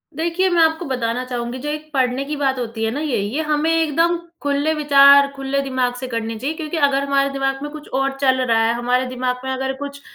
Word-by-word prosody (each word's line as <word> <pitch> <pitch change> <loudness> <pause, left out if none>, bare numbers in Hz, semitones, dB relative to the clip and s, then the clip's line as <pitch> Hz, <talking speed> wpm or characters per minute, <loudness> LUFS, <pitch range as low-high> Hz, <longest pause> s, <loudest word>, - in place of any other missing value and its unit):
देखिए 340 +4 0
मैं 345 -2 +3
आपको 320 +1 +2
बताना 250 -3 -2
चाहूँगी 245 0 -4
जो 295 +3 -4
एक 305 +1 -5
पढ़ने 260 0 +1
की 300 +2 -4
बात 270 -2 0
होती 225 -2 -4
है 220 - -1
ना 275 - -3
ये 300 -5 -1
ये 220 +10 -2
हमें 305 +1 0
एकदम 330 +1 +2 0.2
खुले 285 +2 0
विचार 280 -2 +6
खुले 270 0 -2
दिमाग 260 -2 -1
से 255 +1 -6
करने 230 -2 -3
चाहिए 280 +7 -3
क्योंकि 315 +1 -4
अगर 280 -2 +2
हमारे 275 0 +1
दिमाग 270 0 -2
में 295 - -5
कुछ 305 -1 -10
और 270 0 +1
चल 260 -1 +3
रहा 235 -3 +2
है 230 - +2
हमारे 245 +2 0
दिमाग 250 0 -2
में 265 - -3
अगर 265 0 -2
कुछ 280 0 -7
275 Hz, 230 wpm, -20 LUFS, 255-300 Hz, 0.2 s, विचार